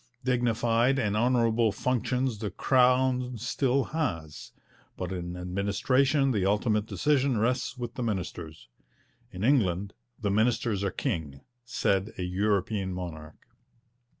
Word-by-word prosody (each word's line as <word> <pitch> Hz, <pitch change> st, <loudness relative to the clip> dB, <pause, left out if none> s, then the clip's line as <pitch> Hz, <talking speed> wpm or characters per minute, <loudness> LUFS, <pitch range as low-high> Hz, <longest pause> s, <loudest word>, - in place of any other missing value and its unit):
Dignified 120 Hz, 0 st, +2 dB
and 105 Hz, -5 st, 0 dB
honourable 115 Hz, -1 st, +2 dB
functions 125 Hz, +1 st, -1 dB
the 105 Hz, -2 st, -3 dB
Crown 125 Hz, +3 st, +2 dB
still 125 Hz, +4 st, 0 dB
has; 80 Hz, -, -3 dB, 0.5 s
but 90 Hz, 0 st, -4 dB
in 90 Hz, -1 st, -5 dB
administration 130 Hz, +10 st, +1 dB
the 105 Hz, -6 st, 0 dB
ultimate 105 Hz, +2 st, +1 dB
decision 140 Hz, -3 st, +1 dB
rests 125 Hz, +4 st, 0 dB
with 120 Hz, -1 st, -5 dB
the -, -, -5 dB
ministers. 90 Hz, -, -4 dB, 0.6 s
'In 95 Hz, +1 st, -6 dB
England 100 Hz, -7 st, +2 dB, 0.3 s
the 105 Hz, -3 st, -1 dB
ministers 110 Hz, -1 st, +1 dB
are 100 Hz, -, +1 dB
king,' 80 Hz, -, -3 dB, 0.2 s
said 100 Hz, -2 st, 0 dB
a 90 Hz, -, -3 dB
European 100 Hz, +1 st, 0 dB
monarch. 80 Hz, -4 st, -7 dB
110 Hz, 120 wpm, -28 LUFS, 95-125 Hz, 0.6 s, Dignified